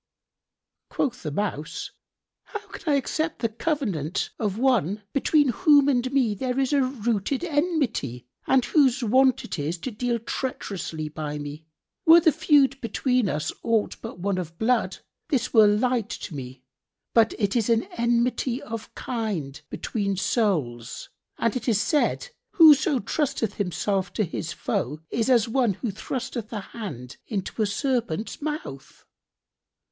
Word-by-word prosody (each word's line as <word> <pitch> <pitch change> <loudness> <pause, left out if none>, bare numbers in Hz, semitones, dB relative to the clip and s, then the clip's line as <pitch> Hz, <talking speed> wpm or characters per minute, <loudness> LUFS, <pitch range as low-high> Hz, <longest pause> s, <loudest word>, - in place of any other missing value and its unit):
Quoth 255 -3 -1
the 155 - -3
Mouse, 155 -2 -3 0.5
"How 420 -2 -7
can 310 - -3
I - - +4
accept 310 +4 -1
the 230 - -1
covenant 215 - -2
of 210 -3 -1
one 215 - +1
between 290 0 +3
whom 285 +1 +5
and 255 -2 +1
me 260 -6 +2
there 250 +5 -2
is 270 +1 +1
a 280 - +4
rooted 245 - -1
enmity, 290 - -1 0.2
and 260 -2 +4
whose 270 -4 +3
wont 260 +3 +4
it - - -5
is 155 +5 -2
to 260 - -4
deal 240 +2 -1
treacherously 195 - -4
by 150 -1 -5
me? 145 +2 -7 0.4
Were 330 +1 +10
the 320 -1 +4
feud 290 -3 +3
between 250 -1 +1
us 150 -1 -2
aught 225 -2 0
but - - -7
one 190 +1 -1
of 165 -2 -6
blood, 235 +3 +1 0.3
this 255 -5 0
were 220 -3 +7
light 230 +1 +1
to 185 - -6
me; 130 -2 -8 0.5
but 225 -1 +4
it 205 -1 0
is 230 -2 +1
an 230 -1 +3
enmity 235 +1 +1
of 225 -3 -7
kind 195 - -3
between 200 -3 -2
souls, 150 - -1 0.3
and 230 0 0
it 255 - -4
is 215 -3 +3
said, 310 - +1 0.2
'Whoso 310 -2 +7
trusteth 240 -3 -1
himself 195 -1 -1
to 215 - +1
his 165 -1 -4
foe 150 0 -2
is 230 +1 0
as 240 -3 +4
one 235 -3 +2
who 235 +1 -3
thrusteth 240 +2 -5
hand 190 - -7
into 205 +1 -3
a 215 - +3
serpent's[FN#62] 230 - -2
mouth.'" 295 - -6
230 Hz, 150 wpm, -25 LUFS, 190-265 Hz, 0.5 s, Were